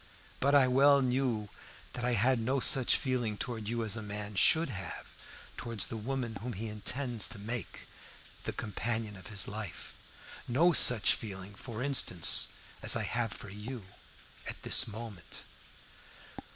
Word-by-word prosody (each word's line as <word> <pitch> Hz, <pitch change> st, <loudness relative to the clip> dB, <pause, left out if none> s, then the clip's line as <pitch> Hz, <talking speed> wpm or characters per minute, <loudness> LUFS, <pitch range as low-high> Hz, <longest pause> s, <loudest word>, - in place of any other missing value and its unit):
But 140 Hz, +2 st, +3 dB
I 135 Hz, -2 st, +6 dB
well 140 Hz, +2 st, +5 dB
knew 125 Hz, -4 st, 0 dB, 0.5 s
that 125 Hz, -, -5 dB
I 125 Hz, 0 st, +1 dB
had 120 Hz, +3 st, +3 dB
no 130 Hz, +4 st, 0 dB
such 130 Hz, 0 st, +4 dB
feeling 125 Hz, -6 st, -1 dB
towards 110 Hz, -3 st, -4 dB
you 115 Hz, -1 st, -1 dB
as 110 Hz, -, -2 dB
a 110 Hz, -, -4 dB
man 105 Hz, 0 st, -5 dB
should 160 Hz, -, +4 dB
have 95 Hz, -6 st, -6 dB, 0.5 s
towards 115 Hz, -5 st, -1 dB
the -, -, -6 dB
woman 120 Hz, 0 st, -3 dB
whom 120 Hz, +2 st, -4 dB
he 110 Hz, +4 st, -5 dB
intends 120 Hz, +2 st, 0 dB
to 115 Hz, -, -7 dB
make 110 Hz, 0 st, -5 dB, 0.6 s
the -, -, -1 dB
companion 110 Hz, 0 st, -3 dB
of 95 Hz, -, -12 dB
his 100 Hz, -3 st, 0 dB
life 105 Hz, -3 st, -7 dB, 0.5 s
no 165 Hz, +9 st, +4 dB
such 125 Hz, -4 st, +6 dB
feeling, 100 Hz, -3 st, -7 dB
for 115 Hz, +3 st, -6 dB
instance, 130 Hz, -11 st, +4 dB, 0.3 s
as -, -, +4 dB
I -, -, 0 dB
have 115 Hz, -2 st, -1 dB
for -, -, -9 dB
you 105 Hz, +2 st, -7 dB, 0.6 s
at -, -, -7 dB
this -, -, +2 dB
moment. 105 Hz, -6 st, -8 dB
115 Hz, 155 wpm, -32 LUFS, 105-125 Hz, 0.6 s, I